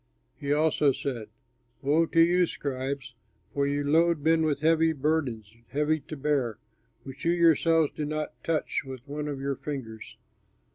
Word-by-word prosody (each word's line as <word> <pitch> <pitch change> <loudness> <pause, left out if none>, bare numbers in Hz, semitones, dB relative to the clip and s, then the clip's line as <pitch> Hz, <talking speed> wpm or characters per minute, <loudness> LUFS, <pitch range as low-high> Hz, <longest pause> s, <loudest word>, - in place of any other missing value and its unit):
He 140 -2 -4
also 150 -1 +3
said, 120 -5 -4 0.5
"Woe 155 +4 +3
to 165 - +1
you 175 +1 +5
scribes! 135 -2 -4 0.4
For 140 0 +1
you 145 0 0
load 165 +1 +3
men 160 +2 +3
with 150 -3 0 0.4
burdens 130 -8 -1
heavy 150 +2 0
to 155 +1 -9
bear, 135 -6 0 0.5
which 135 0 -10
you 170 - +3
yourselves 165 -2 +4
do 150 - -2
not 155 0 -3
touch 160 -2 -1
with 130 0 -9
one 150 +1 -4
of 145 -2 -4
your 140 0 -2
fingers. 115 -7 -7
145 Hz, 150 wpm, -27 LUFS, 135-160 Hz, 0.5 s, you